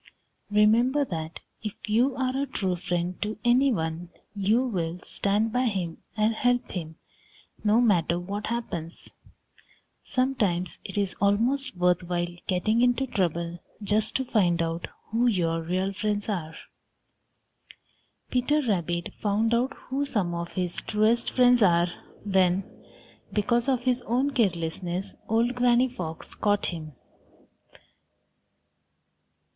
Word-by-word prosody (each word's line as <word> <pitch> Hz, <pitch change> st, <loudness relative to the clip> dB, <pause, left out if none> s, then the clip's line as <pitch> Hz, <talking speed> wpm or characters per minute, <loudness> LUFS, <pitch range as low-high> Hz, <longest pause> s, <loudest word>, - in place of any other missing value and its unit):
Remember 230 Hz, +7 st, +4 dB
that 160 Hz, -6 st, -5 dB, 0.2 s
if 215 Hz, -2 st, -4 dB
you 240 Hz, +5 st, +2 dB
are 260 Hz, 0 st, -1 dB
a 280 Hz, +1 st, 0 dB
true 190 Hz, -8 st, -1 dB
friend 175 Hz, +1 st, -3 dB
to 210 Hz, +1 st, -2 dB
any 255 Hz, +3 st, +4 dB
one, 165 Hz, -3 st, -2 dB, 0.3 s
you 210 Hz, +6 st, +2 dB
will 175 Hz, -8 st, -2 dB
stand 210 Hz, +3 st, +1 dB
by 250 Hz, +1 st, +2 dB
him 185 Hz, -7 st, -2 dB, 0.2 s
and 215 Hz, +1 st, +3 dB
help 245 Hz, +2 st, +1 dB
him, 160 Hz, -3 st, -5 dB, 0.7 s
no 215 Hz, +2 st, +4 dB
matter 175 Hz, -7 st, +3 dB
what 200 Hz, +4 st, -4 dB
happens. 175 Hz, -8 st, -5 dB, 0.9 s
Sometimes 210 Hz, -10 st, 0 dB
it 195 Hz, -, -7 dB
is 200 Hz, -2 st, 0 dB
almost 235 Hz, +5 st, +1 dB
worth 180 Hz, 0 st, +3 dB
while 175 Hz, -1 st, -1 dB, 0.2 s
getting 215 Hz, +5 st, +1 dB
into 245 Hz, +2 st, +3 dB
trouble 170 Hz, -6 st, -1 dB, 0.2 s
just 210 Hz, +2 st, +2 dB
to 265 Hz, -, 0 dB
find 180 Hz, -8 st, +2 dB
out 165 Hz, +1 st, -3 dB, 0.2 s
who 235 Hz, +2 st, +2 dB
your 165 Hz, -6 st, +1 dB
real 185 Hz, +4 st, -1 dB
friends 205 Hz, +1 st, -2 dB
are. 165 Hz, -7 st, -3 dB, 1.8 s
Peter 290 Hz, +4 st, +2 dB
Rabbit 175 Hz, -4 st, -1 dB
found 215 Hz, +2 st, +1 dB
out 250 Hz, +3 st, +2 dB
who 275 Hz, +2 st, -3 dB
some 210 Hz, -11 st, -1 dB
of 170 Hz, 0 st, -4 dB
his 180 Hz, -2 st, -2 dB
truest 220 Hz, +3 st, +1 dB
friends 245 Hz, -1 st, +4 dB
are 175 Hz, -2 st, +4 dB, 0.3 s
when, 190 Hz, -2 st, +2 dB, 0.7 s
because 235 Hz, +4 st, +1 dB
of 250 Hz, -2 st, +1 dB
his 250 Hz, -1 st, +1 dB
own 255 Hz, +5 st, +1 dB
carelessness, 180 Hz, -4 st, -1 dB, 0.2 s
old 230 Hz, +3 st, +2 dB
Granny 245 Hz, 0 st, +3 dB
Fox 170 Hz, -10 st, -7 dB
caught 205 Hz, -1 st, +1 dB
him. 155 Hz, -4 st, -5 dB
205 Hz, 130 wpm, -27 LUFS, 175-240 Hz, 1.8 s, Remember